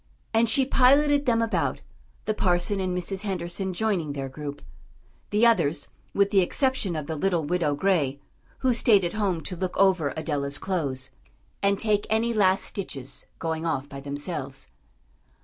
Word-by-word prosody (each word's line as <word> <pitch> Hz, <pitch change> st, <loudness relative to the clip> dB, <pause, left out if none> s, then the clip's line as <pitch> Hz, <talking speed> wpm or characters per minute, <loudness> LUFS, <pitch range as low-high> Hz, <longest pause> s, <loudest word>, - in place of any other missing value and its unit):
And 225 Hz, 0 st, +3 dB
she 265 Hz, +4 st, +5 dB
piloted 285 Hz, +2 st, +4 dB
them 230 Hz, -1 st, +3 dB
about, 225 Hz, -, -1 dB, 0.4 s
the 215 Hz, -, +1 dB
parson 185 Hz, 0 st, +1 dB
and 185 Hz, -1 st, -1 dB
Mrs. 190 Hz, +2 st, -2 dB
Henderson 190 Hz, -1 st, -3 dB
joining 180 Hz, -6 st, -1 dB
their 135 Hz, -1 st, -4 dB
group; 145 Hz, +1 st, -7 dB, 0.7 s
the 210 Hz, +3 st, +3 dB
others, 165 Hz, -10 st, +2 dB, 0.2 s
with 200 Hz, 0 st, +2 dB
the 195 Hz, -, +5 dB
exception 215 Hz, -, 0 dB
of 155 Hz, -2 st, -3 dB
the 160 Hz, -, -4 dB
little 175 Hz, 0 st, 0 dB
Widow 150 Hz, -2 st, 0 dB
Gray, 145 Hz, -5 st, +1 dB, 0.4 s
who 260 Hz, -2 st, +3 dB
stayed 210 Hz, -5 st, +4 dB
at 170 Hz, -, -2 dB
home 195 Hz, -6 st, 0 dB
to 180 Hz, -, -6 dB
look 185 Hz, +1 st, -3 dB
over 185 Hz, -7 st, +3 dB
Adela's 145 Hz, -3 st, -2 dB
clothes, 140 Hz, -9 st, -3 dB, 0.5 s
and 200 Hz, 0 st, +2 dB
take 210 Hz, -1 st, +1 dB
any 225 Hz, +2 st, +1 dB
last 195 Hz, -3 st, +3 dB
stitches, 135 Hz, -10 st, -6 dB
going 160 Hz, -1 st, -3 dB
off 145 Hz, -4 st, -1 dB
by 140 Hz, -1 st, -8 dB
themselves. 140 Hz, -1 st, -4 dB
180 Hz, 160 wpm, -26 LUFS, 150-210 Hz, 0.7 s, she